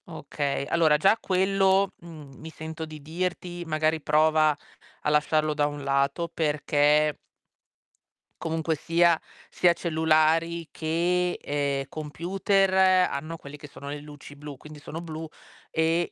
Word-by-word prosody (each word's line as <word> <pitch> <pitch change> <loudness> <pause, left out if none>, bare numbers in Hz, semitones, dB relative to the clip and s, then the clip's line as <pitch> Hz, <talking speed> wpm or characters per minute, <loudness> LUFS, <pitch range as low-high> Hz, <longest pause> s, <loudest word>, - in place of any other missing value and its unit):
Okay, 140 -1 -3
allora 160 -2 +3
già 195 +8 +4
quello, 195 +1 +2
mhmm, 155 -5 -12
mi 160 - -8
sento 160 0 -7
di 155 -2 -11
dirti 175 +2 -4
magari 155 0 0
prova 155 0 +3 0.5
a - - 0
lasciarlo 155 +1 +2
da 145 -1 +1
un 145 -1 -6
lato 140 +4 0
perché 150 -1 +2 1.3
comunque 160 0 -1
sia, 165 +2 +2 0.3
sia 175 - +4
cellulari 160 0 +1
che, 175 +3 0
ehm, 140 -1 -2
computer 190 +6 0 0.4
hanno 155 +4 -5
quelle 140 -2 -11
che 150 0 -11
sono 140 0 -11
le 145 +1 -5
luci 145 -1 -12
blu, 145 -1 -9
quindi 150 +2 -12
sono 155 +2 -7
blu 160 -1 -6 0.4
e 165 +2 +1
155 Hz, 130 wpm, -26 LUFS, 150-170 Hz, 1.3 s, già